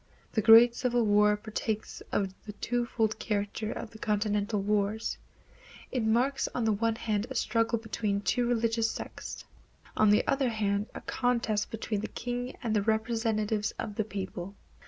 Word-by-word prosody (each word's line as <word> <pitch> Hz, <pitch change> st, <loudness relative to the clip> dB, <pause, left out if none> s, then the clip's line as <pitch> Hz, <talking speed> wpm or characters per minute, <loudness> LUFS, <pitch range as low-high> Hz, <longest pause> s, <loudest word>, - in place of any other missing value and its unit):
The 220 Hz, -, +1 dB
Great 230 Hz, +3 st, +8 dB
Civil 245 Hz, -1 st, +1 dB
War 210 Hz, 0 st, +4 dB
partakes 215 Hz, 0 st, -4 dB
of 195 Hz, -2 st, 0 dB
the 210 Hz, -, -5 dB
twofold 230 Hz, 0 st, -1 dB
character 210 Hz, +1 st, -2 dB
of 225 Hz, -, -6 dB
the 220 Hz, -, -13 dB
continental 210 Hz, 0 st, 0 dB
wars. 210 Hz, +2 st, 0 dB, 0.7 s
It 255 Hz, -, 0 dB
marks 240 Hz, +5 st, +2 dB
on 240 Hz, -, 0 dB
the 220 Hz, -, +3 dB
one 225 Hz, +2 st, +1 dB
hand 215 Hz, -1 st, -1 dB
a 265 Hz, -, -6 dB
struggle 230 Hz, 0 st, +1 dB
between 210 Hz, -2 st, -2 dB
two 240 Hz, +3 st, +1 dB
religious 230 Hz, -1 st, +1 dB
sects; -, -, -7 dB, 0.5 s
on 215 Hz, -, +4 dB
the 210 Hz, -, +4 dB
other 275 Hz, -1 st, +2 dB, 0.5 s
a -, -, -6 dB
contest 235 Hz, -4 st, 0 dB
between 220 Hz, -2 st, -3 dB
the -, -, -3 dB
king 245 Hz, +1 st, -4 dB
and 225 Hz, -2 st, 0 dB
the 210 Hz, -, +3 dB
representatives 220 Hz, -1 st, 0 dB
of 210 Hz, -, -4 dB
the 215 Hz, -, 0 dB
people. 195 Hz, -2 st, -6 dB
220 Hz, 155 wpm, -29 LUFS, 210-230 Hz, 0.7 s, Great